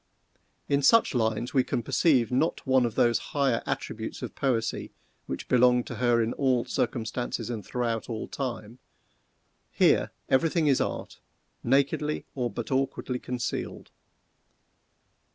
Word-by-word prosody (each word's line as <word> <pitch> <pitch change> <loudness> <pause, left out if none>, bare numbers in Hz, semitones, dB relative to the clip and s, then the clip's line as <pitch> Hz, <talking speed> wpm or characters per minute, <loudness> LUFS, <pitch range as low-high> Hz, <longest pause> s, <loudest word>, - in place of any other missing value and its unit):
In 140 0 +2
such 230 +11 +5
lines 110 0 0
we 130 - +4
can 120 - -2
perceive 125 -5 +2
not 135 +6 0
one 130 -2 +3
of 115 - -7
those 120 -1 +3 0.2
higher 135 -5 +2
attributes - - -4
of - - -5
Poesy 125 -5 -1 0.4
which - - -5
belong 125 0 +4
to 120 - -7
her 120 -1 +3
in 115 - -2
all 130 -3 +1
circumstances 120 0 -2
and 110 -3 -4
throughout 115 +1 -2
all 110 -2 -4
time. 120 -3 -5 0.9
Here - - +3 0.2
every 135 +5 +3
thing 165 -1 +1
is 140 -3 +3
art, - - -4 0.4
nakedly, 140 +4 +1
or 125 -3 -1
but 120 +2 -6
awkwardly 130 -1 -1
concealed. 125 -1 -4
125 Hz, 135 wpm, -27 LUFS, 115-135 Hz, 0.9 s, such